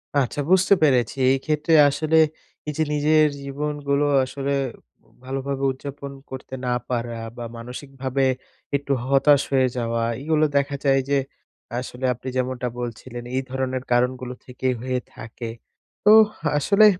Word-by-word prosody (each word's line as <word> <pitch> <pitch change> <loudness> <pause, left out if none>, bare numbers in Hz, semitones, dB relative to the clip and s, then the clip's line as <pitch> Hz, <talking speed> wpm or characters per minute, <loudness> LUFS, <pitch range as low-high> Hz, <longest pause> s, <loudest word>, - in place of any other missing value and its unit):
আচ্ছা 140 +1 +1
বুঝতে 190 +1 +5
পেরেছি, 130 -3 +3
এই 135 - +3
ক্ষেত্রে 155 +1 +1 0.2
আসলে 155 +3 +1 0.5
এই 150 - -2
যে 160 - +3
নিজের 155 +1 +4
জীবনগুলো 145 +1 -1 0.2
আসলে, 135 +1 -3 0.7
ভালো 135 +1 -3
ভাবে 140 -1 -2
উদযাপন 140 +1 -7 0.2
করতে 130 0 -8
না 125 - +1 0.2
পারা 120 -1 -2 0.2
বা 120 - -5
মানসিক 125 +4 -8
ভাবে 135 0 +1 0.5
একটু 140 0 0
হতাশ 140 +1 +5
হয়ে 130 -1 +4
যাওয়া, 115 -1 -1 0.2
এইগুলো 155 +1 +2
দেখা 140 0 0
যায় 135 -1 +4
যে 140 - +3 0.6
আসলে 130 0 -5
আপনি 125 +2 -11
যেমনটা 125 -1 -1
বলছিলেন 120 0 -6
এই 130 - +1
ধরনের 130 -1 -2
কারণগুলো 125 +1 +1
থেকেই 130 0 -1
হয়ে 130 0 -1 0.2
থাকে। 115 +1 -7 0.6
তো 210 - +8 0.5
আসলে, 200 +9 +5
135 Hz, 140 wpm, -23 LUFS, 125-145 Hz, 0.7 s, তো